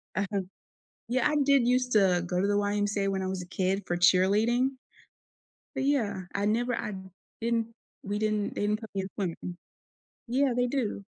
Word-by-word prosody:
Uh-huh. 200 0 0 0.7
Yeah, 260 +4 +1
I 300 - +1
did 275 -3 +4
used 250 0 +2
to 185 -4 +4
go 180 0 0
to 200 - +2
the 205 - +1
YMCA 205 0 0
when 190 -1 -1
I - - -2
was 185 -1 -3
a - - -9
kid 190 +2 -1
for 175 - -1
cheerleading. 210 +9 +4 1.1
But, - - 0
yeah, 220 -9 +1
I 200 +1 0
never 240 +3 +1
I 210 - -4 0.5
didn't 230 -1 0 0.4
we 205 +1 -2
didn't 215 -1 0
they - - -2
didn't 210 +1 +1
put 220 - -8
me 195 - 0
in 190 - -6
swimming. 175 -2 -4 0.7
Yeah, 265 +1 +2
they 245 0 +2
do. 235 -6 -2
205 Hz, 180 wpm, -28 LUFS, 195-240 Hz, 1.1 s, did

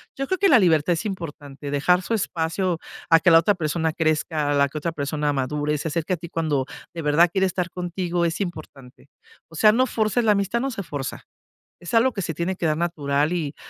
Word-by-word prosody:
yo 275 - -2
creo 375 - 0
que 395 - +4
la 270 -6 +7
libertad 170 -3 +3
es 170 +6 -4
importante, 145 -7 -6
dejar 180 +6 +2
su 230 - -3
espacio 170 -2 -1 0.3
a 165 - +8
que 175 - +4
la 165 - +8
otra 185 +5 +2
persona 160 -1 -1
crezca, 155 -2 0
a - - +2
la 140 0 +3
que 155 - -7
otra 170 +3 -2
persona 150 0 -2
madure, 145 +3 -1
se 160 - -3
acerque 165 +4 -2
a - - -1
ti 170 +1 -9
cuando 155 -6 -1 0.3
de 165 - -4
verdad 150 +4 +4
quiere 190 0 +2
estar 180 -1 -2
contigo, 175 -1 -2
es 165 -1 -2
importante. 145 -8 -8 0.4
O 165 - -14
sea, 215 +6 +6
no 250 +4 +3
fuerces 220 +1 0
la 220 - +4
amistad, 200 +3 0
no, 270 - -1
se 225 - -5
forza. 145 -5 -5 0.6
Es 175 - -8
algo 240 +3 +4
que 200 - -3
se 165 - -3
tiene 170 +4 -2
que - - -2
dar 155 - +1
natural 150 -3 0
y 155 -5 -3
165 Hz, 230 wpm, -23 LUFS, 150-185 Hz, 0.6 s, a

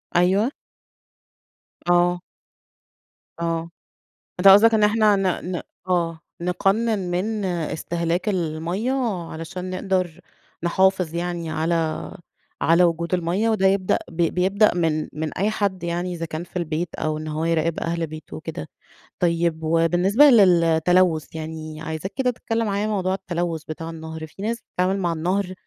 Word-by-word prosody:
أيوه. 190 +8 +3 1.4
آه. 175 0 +3 1.2
آه، 165 0 -1 0.7
أنت 195 - +5
قصدك 210 +4 +8
إن 215 -1 +3
إحنا 210 0 +4
ن 185 -2 -1
ن 175 - -3 0.3
آه، 170 -2 0 0.2
نقنّن 200 +5 +1
من 205 +3 -1
إستهلاك 170 +2 -2
المَيّة، 175 +7 -1 0.4
علشان 180 +3 -6
نقدر 185 -3 -1 0.4
نحافظ 185 -1 +2
يعني 170 -1 -3
على 160 0 -1 0.5
على 170 +2 +4
وجود 170 +1 0
المَيّة، 185 +6 +1
وده 195 -3 +3
يبدأ 190 -1 +2
بيبدأ 180 +5 +2
من 160 -3 0
من 155 0 -4
أي 200 +3 +1
حد 200 -4 -1
يعني 175 +1 -2
إذا 165 -1 -4
كان 160 +1 -5
في 180 - -18
البيت 170 -1 -2
أو 155 0 -2
إن 155 - -6
هو 155 +1 -2
يراقب 165 0 0
أهل 165 -1 -2
بيته 155 0 -9
وكده، 155 - -6 0.5
طيب 170 -2 +1
وبالنسبة 175 - +3
للتلوث 175 - +4
يعني، 155 -1 -6
عايزاك 160 +4 -5
كده 255 -2 +1
تتكلم 225 -1 -2
معايا 205 +1 0
موضوع 190 -3 0
التلوث 175 -4 -3
بتاع 160 +1 -6
النهر، 160 -1 -7
في 175 +5 -13
ناس 230 +2 -1
بتتعامل 185 +2 -1
مع 175 -2 0
النهر، 180 +4 -1
175 Hz, 135 wpm, -23 LUFS, 165-190 Hz, 1.4 s, قصدك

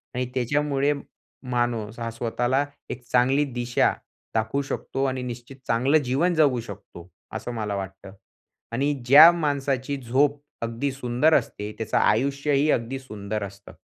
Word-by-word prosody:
आणि 125 0 0
त्याच्यामुळे 145 +2 +1 0.6
माणूस 120 -2 -1
हा 115 0 -3
स्वतःला 120 +4 0 0.2
एक 125 - -6
चांगली 130 +4 +3
दिशा 120 0 +1 0.4
दाखवू 110 +5 0
शकतो 135 -1 -3
आणि 130 -1 -1
निश्चित 120 +1 -7
चांगलं 130 +6 +3
जीवन 140 +8 +1
जगू 145 -6 +3
शकतो, 95 -5 -11 0.2
असं - - -4
मला 105 -3 -3
वाटतं. 95 0 -7 0.6
आणि 140 +5 +1
ज्या 150 +7 +10
माणसाची 140 -4 -1
झोप 140 +4 +1 0.2
अगदी 115 +4 -2
सुंदर 130 +4 +1
असते. 105 -7 0
त्याचं 115 - -1
आयुष्यही 140 +5 +2
अगदी 120 +3 -1
सुंदर 105 -4 -5
असतं. 100 0 -10
125 Hz, 135 wpm, -25 LUFS, 115-140 Hz, 0.6 s, ज्या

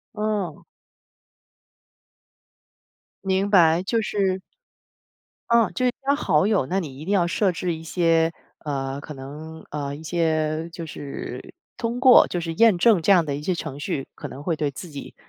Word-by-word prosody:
嗯。 210 -6 -2 2.6
明 190 +1 +1
白， 170 -4 +5
就 225 +4 0
是 195 -3 0 1.1
嗯， 235 -1 +4
就 255 - 0
是 250 - +3 0.2
加 280 - +4
好 160 - +2
友， 205 -10 +2
那 185 +8 -1
你 145 -8 -7
一 155 - -8
定 200 - 0
要 180 -4 +3
设 190 +2 +1
置 175 0 -2
一 160 - -9
些， 165 -1 +2 0.3
呃 135 -2 -3
可 150 - -8
能， 150 +4 -9
呃 145 -1 -4
一 155 - -11
些 160 -1 0
就 170 0 -7
是 140 -4 -7 0.2
通 240 0 -2
过 255 -1 +7
就 175 - -2
是 165 -1 -4
验 220 +1 +5
证 200 0 +4
这 200 - +3
样 175 -4 +5
的 140 -2 -2
一 145 - -6
些 185 - 0
程 155 -5 -6
序， 140 -2 -3
可 - - -7
能 135 - -9
会 165 +1 0
对 150 -2 -1
自 175 +6 -9
己， 140 -2 -9
165 Hz, 185 characters per minute, -24 LUFS, 150-195 Hz, 2.6 s, 过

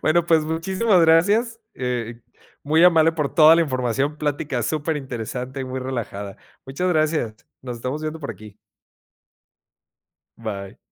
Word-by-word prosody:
Bueno, 170 +2 +3
pues, 160 -2 +3
muchísimas 185 +5 +1
gracias. 205 +9 +3
Eh, 120 -2 -4 0.4
muy 160 +4 +3
amable 165 -2 +5
por 150 -4 -3
toda 160 0 +8
la 170 - +4
información, 135 +1 -1
plática 145 -4 -2
superinteresante 135 -3 -3
y - - -3
muy 130 0 -5
relajada. 110 -6 -5 0.3
Muchas 140 +8 -2
gracias. 155 -9 0 0.3
Nos 125 -2 -6
estamos 130 +6 -4
viendo 155 +1 -4
por 140 - -5
aquí. 105 +1 -12 1.8
Bye. 100 -4 -6
145 Hz, 130 wpm, -22 LUFS, 125-160 Hz, 1.8 s, toda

